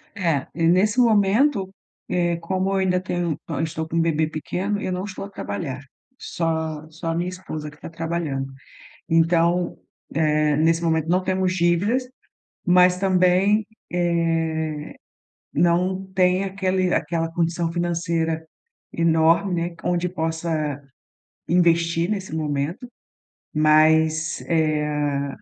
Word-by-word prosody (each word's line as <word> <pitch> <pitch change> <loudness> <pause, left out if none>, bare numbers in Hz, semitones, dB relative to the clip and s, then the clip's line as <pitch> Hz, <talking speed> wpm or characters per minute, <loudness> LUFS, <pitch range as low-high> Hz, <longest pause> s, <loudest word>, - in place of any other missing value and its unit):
É, 165 - 0
e 165 - -2
nesse 205 +7 +3
momento, 215 0 +3 0.4
eh, 175 -1 +1
como 185 +3 -2
eu - - 0
ainda 185 -1 +2
tenho 175 -4 -2
eu 155 -5 -2
estou 160 0 -3
com 165 +1 -1
bebê 160 -1 +1
pequeno, 185 +6 -3
eu 185 - -2
não 180 +1 -2
estou 195 -1 -6
a - - -10
trabalhar, 130 - -5 0.4
só 160 - -3
só 160 +2 -6
a 165 - -1
minha 175 +2 -1
esposa 155 -5 -6
que 150 - -15
está - - -9
trabalhando. 160 -5 -3 0.6
Então, 170 +2 +2 0.4
eh, 150 -1 +2
nesse 165 +2 +2
momento 160 -1 +1
não 180 +2 +2
temos 185 0 0
dívidas, 185 +9 +1 0.6
mas 180 0 +5
também, 190 +2 +3 0.3
eh, 165 -3 -1 0.6
não 180 +4 +1
tem 185 +1 +3
aquele 185 -1 0
aquela 165 +1 -1
condição 170 0 -1
financeira 165 -2 -1 0.5
enorme, 170 +2 +2
onde 175 0 0
possa 160 -4 -2 0.7
investir 170 0 +2
nesse 195 -6 -3
momento, 150 - -2 0.7
mas, 155 +1 +3
eh, 150 -3 0
170 Hz, 120 wpm, -23 LUFS, 160-185 Hz, 0.7 s, mas